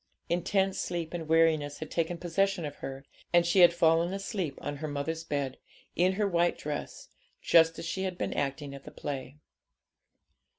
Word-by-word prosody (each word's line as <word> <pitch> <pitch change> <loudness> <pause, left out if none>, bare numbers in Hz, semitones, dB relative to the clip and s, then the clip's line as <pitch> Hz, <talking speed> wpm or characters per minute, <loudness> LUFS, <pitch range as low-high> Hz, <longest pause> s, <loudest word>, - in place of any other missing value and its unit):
Intense 190 +3 +1
sleep 170 -2 -3
and 165 -2 -4
weariness 160 -3 +3
had 155 - -7
taken 170 +1 -1
possession 180 +1 0
of 145 -1 -6
her, 135 +1 -7 0.3
and 175 0 +5
she 175 +3 +3
had 175 -1 +9
fallen 170 +1 +3
asleep 195 -7 -3
on 145 0 -4
her 155 +2 -4
mother's 155 +3 -3
bed, 140 -4 -3 0.4
in 185 +2 +3
her 205 +1 +1
white 175 -2 +2
dress, 150 -1 -6 0.3
just 165 -1 +4
as - - -6
she 190 +3 -3
had 185 -2 -2
been - - -2
acting 140 0 -2
at 140 0 -10
the - - -9
play. 135 0 -6
165 Hz, 175 wpm, -30 LUFS, 145-175 Hz, 0.4 s, had